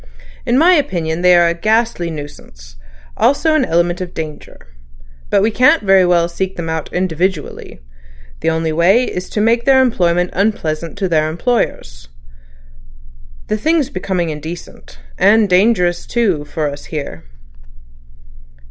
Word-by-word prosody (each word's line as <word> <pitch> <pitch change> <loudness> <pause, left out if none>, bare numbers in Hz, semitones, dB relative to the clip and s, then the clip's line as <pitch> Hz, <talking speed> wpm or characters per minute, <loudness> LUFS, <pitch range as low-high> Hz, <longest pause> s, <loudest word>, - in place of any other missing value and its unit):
In 240 - +2
my 340 +5 +5
opinion 175 - -1
they 180 0 +5
are 175 0 +4
a 170 - +1
ghastly 215 -1 0
nuisance; 145 - -11 0.4
also 300 +4 +2
an 310 -3 +2
element 175 -3 0
of 180 -1 -7
danger. 155 -2 -7 0.7
But - - +2
we 220 - +2
can't 250 -1 +3
very 190 -2 +4
well 170 -1 +2
seek 190 +2 -4
them 170 -1 -5
out 160 -1 -4
individually. 180 - -3 0.6
The - - 0
only 160 0 -1
way 180 +9 +3
is 180 -6 -5
to - - -3
make 235 +2 +1
their 270 -1 +5
employment 180 -8 +1
unpleasant 170 -5 -2
to 195 -2 -1
their 155 -3 +1
employers. 155 - -3 1.4
The 215 - -2
thing's 300 +3 0
becoming 180 - -2
indecent. 155 - -9 0.2
And 215 0 +4
dangerous 180 -2 +1
too, 195 -11 0
for 155 0 -3
us, 145 0 -7
here." 140 - -7
180 Hz, 140 wpm, -16 LUFS, 160-220 Hz, 1.4 s, my